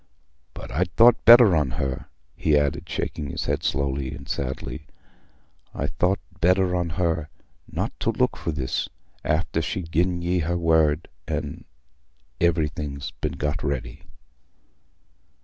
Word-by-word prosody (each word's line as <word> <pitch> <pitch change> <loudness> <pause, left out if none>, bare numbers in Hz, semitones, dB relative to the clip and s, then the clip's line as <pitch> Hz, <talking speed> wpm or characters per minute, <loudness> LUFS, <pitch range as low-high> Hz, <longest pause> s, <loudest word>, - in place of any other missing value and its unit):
But - - -8
I'd 90 +4 0
thought 120 0 +6
better 120 -6 +9
on 75 -4 +2
her"—he 70 +3 -2
added, 70 -2 -1
shaking 75 -3 -3
his - - -4
head - - 0
slowly 70 -1 -1
and 70 -1 -11
sadly—"I'd 70 +3 -7
thought 95 +2 +3 0.2
better 90 +1 +3
on 85 -1 0
her, 80 -3 0 0.4
nor - - -1
to - - 0
look - - +1
for - - -5
this, 70 -4 -2 0.3
after 80 +1 0
she'd 80 +1 -4
gi'en 85 +1 +1
y' 90 +1 +1
her 85 +2 0
word, 80 -2 +2 0.2
an' 75 -2 -4 0.7
everything 75 -4 0 0.2
been - - -1
got 75 +4 -2
ready." 65 -4 -4
80 Hz, 130 wpm, -24 LUFS, 70-90 Hz, 0.7 s, better